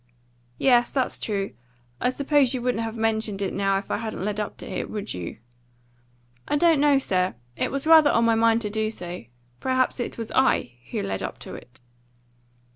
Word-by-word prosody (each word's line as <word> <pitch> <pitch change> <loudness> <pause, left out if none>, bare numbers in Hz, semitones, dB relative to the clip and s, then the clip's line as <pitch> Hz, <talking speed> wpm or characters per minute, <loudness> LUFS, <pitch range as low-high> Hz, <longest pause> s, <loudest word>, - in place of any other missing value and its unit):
"Yes, 240 - +4
that's 260 -2 -1
true. 200 -2 -2 0.5
I 250 - +3
suppose 275 0 +2
you 250 - -3
wouldn't 245 -2 0
have 225 0 -5
mentioned 220 -2 0
it 195 - -2
now 195 0 +1
if 195 - -6
I - - +1
hadn't 220 -3 -4
led 210 0 -2
up 210 - -4
to - - -9
it, - - -4
would 210 -2 -4
you?" 90 -2 -6 1.1
"I - - +1
don't 330 -1 +4
know, 290 -1 +5
sir. 185 - 0 0.2
It - - -1
was 275 +1 -1
rather 315 -2 +7
on 230 -3 +3
my 230 - +4
mind 225 0 +3
to 210 -2 -3
do 220 0 0
so. 180 - -7 0.3
Perhaps 255 0 +1
it 240 - -4
was 230 -2 -5
I 260 - +2 0.2
who - - -2
led 95 -1 -3
up - - -5
to - - -8
it." 125 +1 -12
225 Hz, 200 wpm, -25 LUFS, 200-260 Hz, 1.1 s, rather